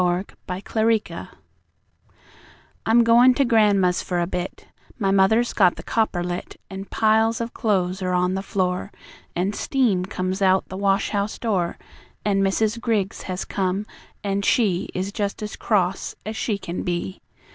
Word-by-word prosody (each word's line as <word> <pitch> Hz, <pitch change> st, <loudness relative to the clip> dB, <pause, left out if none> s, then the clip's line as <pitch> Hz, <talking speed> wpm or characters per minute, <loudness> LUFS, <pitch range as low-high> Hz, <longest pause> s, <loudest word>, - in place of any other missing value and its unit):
On 180 Hz, +2 st, +1 dB, 0.2 s
Washing 220 Hz, +4 st, +1 dB
Day -, -, -8 dB, 1.6 s
"I'm 230 Hz, +2 st, +5 dB
going 240 Hz, +2 st, +6 dB
to 275 Hz, -, +3 dB
gran'ma's 205 Hz, -6 st, +3 dB
for 180 Hz, -1 st, -2 dB
a 175 Hz, -, +1 dB
bit 180 Hz, +1 st, -5 dB, 0.3 s
My 195 Hz, -5 st, +1 dB
mother's 210 Hz, +5 st, +3 dB
got 185 Hz, -4 st, +4 dB
the -, -, -9 dB
copper 215 Hz, -6 st, 0 dB
lit; 175 Hz, 0 st, -5 dB
An' 190 Hz, +1 st, -6 dB
piles 220 Hz, +2 st, +2 dB
of 230 Hz, 0 st, -4 dB
clothes 190 Hz, -3 st, 0 dB
are 185 Hz, -1 st, -1 dB
on 180 Hz, +1 st, +2 dB
the 190 Hz, -, -1 dB
floor, 185 Hz, -1 st, -1 dB, 0.4 s
An' 185 Hz, +4 st, 0 dB
steam 215 Hz, -8 st, +1 dB
comes 185 Hz, +1 st, -3 dB
out 190 Hz, 0 st, +3 dB
the 185 Hz, -, -6 dB
wash 195 Hz, +1 st, +1 dB
house 205 Hz, 0 st, -1 dB
door; 190 Hz, -7 st, -1 dB, 0.5 s
An' 200 Hz, -1 st, +2 dB
Mrs. 215 Hz, +4 st, +1 dB
Griggs 215 Hz, -5 st, -1 dB
has 185 Hz, 0 st, -3 dB
come, 195 Hz, +1 st, -1 dB, 0.4 s
an' 200 Hz, 0 st, 0 dB
she 200 Hz, -4 st, +1 dB
Is 190 Hz, +2 st, -2 dB
just 205 Hz, 0 st, -3 dB
as 210 Hz, -, -5 dB
cross 190 Hz, -3 st, 0 dB
as 215 Hz, +1 st, -4 dB
she 215 Hz, -2 st, -1 dB
can 175 Hz, -3 st, -5 dB
be. 180 Hz, +1 st, -3 dB
195 Hz, 160 wpm, -23 LUFS, 185-220 Hz, 1.6 s, going